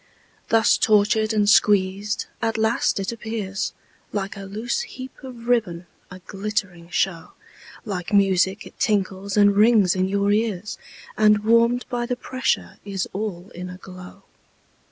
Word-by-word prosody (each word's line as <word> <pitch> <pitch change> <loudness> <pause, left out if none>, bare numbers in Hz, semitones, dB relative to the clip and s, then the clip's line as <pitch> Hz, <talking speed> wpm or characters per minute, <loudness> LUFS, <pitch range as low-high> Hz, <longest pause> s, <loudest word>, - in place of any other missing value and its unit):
Thus 225 0 +4
tortured 215 +1 +3
and 210 -2 +2
squeezed, 205 0 +3 0.2
at 225 -1 0
last 220 -1 +1
it 195 - -2
appears 220 -4 -4 0.4
Like 200 0 -3
a 200 -1 -8
loose 215 +5 -3
heap 260 0 -8
of 240 -3 -10
ribbon, 195 -8 0 0.2
a 185 - -9
glittering 195 -4 -4
show, 180 -2 -1 0.5
Like 185 -5 -4
music 195 0 +2
it - - -14
tinkles 200 -1 0
and 205 -1 +5
rings 210 -4 +5
in 185 0 +1
your 200 +1 +1
ears, 210 -2 -1 0.4
And 210 -1 +4
warm'd 235 +2 +3
by 240 -1 -2
the 250 - -1
pressure 255 0 -2
is 195 -2 -3
all 195 -2 -5
in 180 +1 -7
a 180 - -8
glow. 185 +1 -12
205 Hz, 145 wpm, -23 LUFS, 190-220 Hz, 0.5 s, and